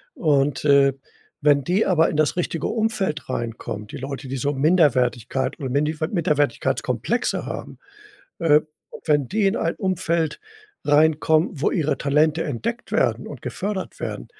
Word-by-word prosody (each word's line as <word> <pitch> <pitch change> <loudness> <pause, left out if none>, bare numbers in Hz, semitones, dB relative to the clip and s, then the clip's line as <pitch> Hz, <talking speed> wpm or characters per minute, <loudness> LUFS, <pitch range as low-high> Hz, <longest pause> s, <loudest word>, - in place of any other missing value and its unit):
Und, 145 -3 +1
äh, 140 -2 +5 0.5
wenn 145 -1 +4
die 185 +9 +1
aber 165 -3 +3
in - - -4
das 155 +3 +1
richtige 165 -3 -1
Umfeld 215 - -1
reinkommt, 115 -3 -5
die - - -6
Leute, 135 +1 -6
die 135 - -3
so 140 +4 -1
Minderwertigkeit 135 -4 +1
und 130 -3 -4
Minifa 155 +3 0
Minderwertigkeitskomplexe 150 -6 0
haben - - -7 0.6
äh, 155 -3 +5 0.5
wenn 145 -4 +2
die 210 -1 +1
in 195 - +1
ein - - -1
Umfeld 170 -5 -1 0.4
reinkommen, 155 +2 +3
wo 145 - 0
ihre 155 -5 0
Talente 150 +3 +2
entdeckt 230 - -4
werden - - +1
und - - -9
gefördert 195 -1 -4
werden, - - -5
150 Hz, 140 wpm, -23 LUFS, 140-170 Hz, 0.6 s, äh